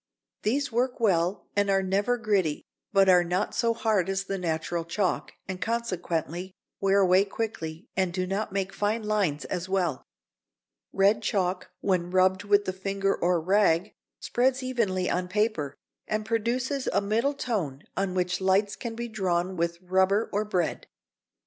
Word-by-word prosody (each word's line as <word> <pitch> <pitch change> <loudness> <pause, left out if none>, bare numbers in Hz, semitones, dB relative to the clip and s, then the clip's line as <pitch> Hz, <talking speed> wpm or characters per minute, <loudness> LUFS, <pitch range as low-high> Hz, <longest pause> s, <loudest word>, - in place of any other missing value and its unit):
These 275 +5 0
work 245 +2 0
well 185 -4 +1
and 205 0 +2
are 195 0 +3
never 200 +6 +1
gritty, 200 -9 0 0.3
but 195 -2 +5
are 180 -1 +6
not 175 +2 -1
so 230 -1 +2
hard 215 -5 +1
as 195 0 0
the 195 0 -3
natural 165 0 -2
chalk, 180 +2 -1
and 185 -1 -5
consequently 185 -5 -2 0.2
wear 195 0 +3
away 185 +1 +5
quickly 195 -6 -5
and 185 -2 +1
do 185 +1 -1
not 195 +3 -2
make 195 0 -2
fine 215 +2 0
lines 200 -9 0
as 180 +1 -4
well. 180 -8 0 0.9
Red 205 +3 +3
chalk 185 -3 -1
when 180 -3 +1
rubbed 185 +1 +3
with 205 0 +3
the 185 - -2
finger 195 +1 -1
or 175 +1 +1
a - - +2
rag 190 0 +2 0.3
spreads 260 +2 +1
evenly 210 -8 0
on 180 0 0
paper, 180 -8 0 0.3
and 215 0 -1
produces 245 +5 -1
a - - +2
middle 225 +8 0
tone 175 - -3
on 190 -1 -1
which 180 0 0
lights 195 +1 +2
can 225 +3 -6
be 235 +1 -4
drawn 185 -4 -1
with 170 0 -1
rubber 190 +3 +2
or 205 +1 +1
bread. 185 -5 -2
195 Hz, 160 wpm, -27 LUFS, 180-215 Hz, 0.9 s, are